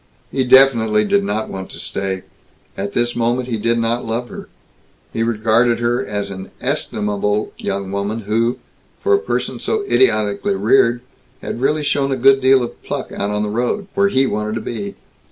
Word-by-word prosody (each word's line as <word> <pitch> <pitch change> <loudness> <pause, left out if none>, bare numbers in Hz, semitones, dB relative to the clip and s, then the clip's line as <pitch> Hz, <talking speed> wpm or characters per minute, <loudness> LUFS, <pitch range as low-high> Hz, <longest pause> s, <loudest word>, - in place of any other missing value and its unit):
He 135 - +1
definitely 115 -5 +5
did 100 -1 +2
not 105 +2 -2
want 95 -1 -6
to - - -6
stay. 95 -1 -3 0.5
At 100 +1 -4
this 120 0 +1
moment 120 +2 0
he 115 - -1
did 115 +2 +1
not 115 +1 0
love 115 +2 -3
her. - - -9 0.6
He 115 - -2
regarded 115 +1 +2
her 120 +2 0
as 100 -4 -3
an 95 0 -7
estimable 105 0 -1
young 100 -1 -3
woman 100 +3 -2
who, 115 +3 0 0.5
for 410 - +3
a 400 - +5
person 440 - -3
so 435 -2 -1
idiotically 150 - +2
reared, 125 -12 +3 0.4
had 120 - -5
really 150 +3 +1
shown 140 -1 0
a 135 - 0
good 135 +2 +5
deal 130 0 +5
of 120 - -7
pluck - - -5
out 100 - -2
on 105 0 -1
the 105 - -2
road 125 - -1
where 200 0 +3
he 135 -7 +3
wanted 105 -2 -2
to 115 - -3
be. 105 -3 -5
115 Hz, 185 wpm, -19 LUFS, 105-130 Hz, 0.6 s, definitely